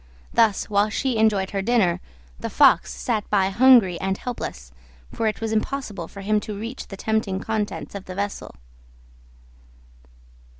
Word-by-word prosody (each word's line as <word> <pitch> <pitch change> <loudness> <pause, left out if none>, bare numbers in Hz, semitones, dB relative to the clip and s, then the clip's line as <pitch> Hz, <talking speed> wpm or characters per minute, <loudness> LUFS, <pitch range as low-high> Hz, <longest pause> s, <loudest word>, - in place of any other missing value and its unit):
Thus, 220 -4 +3
while 205 0 +2
she 250 +2 -1
enjoyed 205 -3 +2
her 195 - -1
dinner, 200 -5 +2 0.4
the - - -4
Fox - - +4
sat 220 -4 -2
by 195 -2 +2
hungry 230 -5 +5
and 190 0 -1
helpless, 65 - -6 0.4
for 225 - -1
it 215 - -2
was 225 -1 -2
impossible 215 -5 -2
for 200 - -10
him 210 +2 +1
to 210 -1 -6
reach 230 +5 -6
the 195 - -9
tempting 220 -3 -1
contents 215 0 -3
of 200 -1 -7
the 185 - -8
vessel. 200 - -4
210 Hz, 155 wpm, -23 LUFS, 195-225 Hz, 0.4 s, hungry